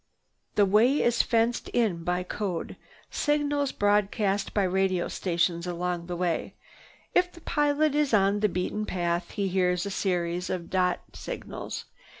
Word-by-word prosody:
The 205 - +5
way 225 +8 +4
is 235 -1 +3
"fenced" 230 0 +1
in 200 -9 +1
by 180 +1 0
code 180 -2 -4 0.4
signals 290 -2 +1
broadcast 205 0 +1
by 205 - +1
radio 185 -1 +1
stations 170 -1 0
along 175 0 -2
the 175 - -3
way. 175 -2 -1 0.6
If 360 0 +3
the 340 - -15
pilot 295 -1 +1
is 295 -1 +2
on 200 -1 +3
the 210 0 +2
beaten 185 +4 -2
path 175 -1 -1
he 200 -2 -2
hears 180 -1 +1
a 200 - -3
series 180 -2 -1
of 175 -2 -4
dot 180 -1 +1
signals. - - -6
195 Hz, 150 wpm, -27 LUFS, 180-230 Hz, 0.6 s, The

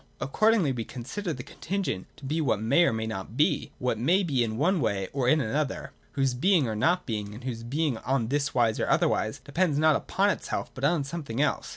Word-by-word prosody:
Accordingly 210 - +2
we 120 -3 -3
consider 145 - -5
the 125 -5 -5
contingent 160 - -3
to 140 - -11
be 155 +4 0
what 130 -8 +1
may 115 +11 +4
or - - +3
may 110 0 -2
not 110 +1 -6
be, 150 - +1
what 125 -3 -1
may 175 - +3
be 135 -8 +1
in 110 -1 -3
one 170 +5 +2
way 100 -5 -1
or 130 -3 +1
in 155 - +4
another, 140 +3 -2 0.2
whose 135 -2 +1
being 160 +2 +3
or 110 - -2
not 175 +12 +2
being, 105 -3 -4
and 120 - -10
whose 120 -3 -4
being 135 +1 -1
on 125 -4 -1
this 140 0 0
wise 115 -3 +2
or - - 0
otherwise, 110 0 +1
depends 155 0 +1
not 155 0 +4
upon 200 +7 +1
itself - - -4
but 130 - -9
on 150 +1 +2
something 140 -5 -5
else. 150 -1 0
135 Hz, 220 wpm, -27 LUFS, 115-160 Hz, 0.2 s, may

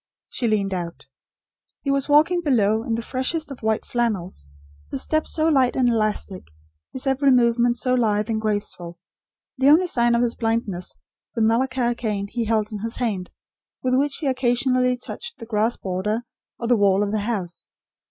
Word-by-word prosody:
She 240 - -1
leaned 200 -3 +1
out. 170 -6 -5 0.8
He 275 - -1
was 275 +1 0
walking 315 +5 +4
below 220 -8 +2
in 230 0 -2
the 230 - -4
freshest 280 +5 -1
of 275 - -8
white 220 0 0
flannels; 195 - -2 0.4
his 130 - -2
step 310 0 0
so 315 - 0
light 265 -5 +3
and 255 -2 +3
elastic; 215 -4 -1 0.4
his 260 - -7
every 270 +1 +2
movement 240 -1 +3
so 255 0 +1
lithe 215 -4 +1
and 220 -2 -1
graceful; 205 -5 -3 0.6
the 270 +1 +5
only 325 +5 +6
sign 240 -8 +2
of 235 - +2
his 235 -1 +1
blindness 225 -6 -2 0.4
the 230 - +1
Malacca 240 +2 +1
cane 215 -4 -2
he 230 +2 -3
held 215 0 0
in 210 - -5
his 225 +3 -4
hand, 205 -7 -2 0.5
with 255 0 +1
which 275 +2 +2
he 315 - -5
occasionally 250 -1 +1
touched 470 - -7
the 230 - -9
grass 225 +1 +1
border, 200 +5 -2 0.3
or 235 - -5
the 240 -1 +4
wall 200 -1 +3
of 205 - -2
the 215 - 0
house. 200 -5 -4
235 Hz, 180 wpm, -23 LUFS, 210-255 Hz, 0.8 s, only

